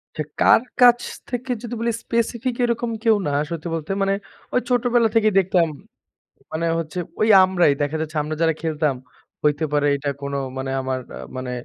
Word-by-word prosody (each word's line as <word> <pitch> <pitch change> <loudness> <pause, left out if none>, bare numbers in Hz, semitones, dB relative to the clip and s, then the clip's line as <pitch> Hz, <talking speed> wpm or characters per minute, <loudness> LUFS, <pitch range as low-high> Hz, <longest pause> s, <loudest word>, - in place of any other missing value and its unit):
আচ্ছা, 155 - -2 0.2
কার - - +6 0.2
কাছ 245 -1 +7 0.3
থেকে 250 +1 -3
যদি 240 -1 -6
বলি 235 +1 0
স্পেসিফিক 235 +1 -1
এরকম 235 0 -1
কেউ 225 -2 +5
না। 145 - -1 0.2
সত্যি 170 0 -5
বলতে 160 +2 -5
মানে 195 0 +2 0.4
ওই 250 - +3
ছোটবেলা 245 -1 +3
থেকেই 215 -2 +4
দেখতাম, 180 -2 +2 0.8
মানে 160 +1 -2
হচ্ছে 165 +2 -5 0.2
ঐ - - -3 0.2
আমরাই 180 -5 +3
দেখা 145 +2 -1
যাচ্ছে 160 0 -4
আমরা 155 +1 -4
যারা 165 -1 +3
খেলতাম 155 -3 0 0.5
হইতে 150 +1 +2
পারে 145 0 +2
এইটা 140 +1 -3
কোনো 140 0 -3 0.2
মানে 135 0 -3
আমার 130 0 -2
অ্যা - - -8 0.2
মানে 130 -1 -4
170 Hz, 175 wpm, -22 LUFS, 150-235 Hz, 0.8 s, কাছ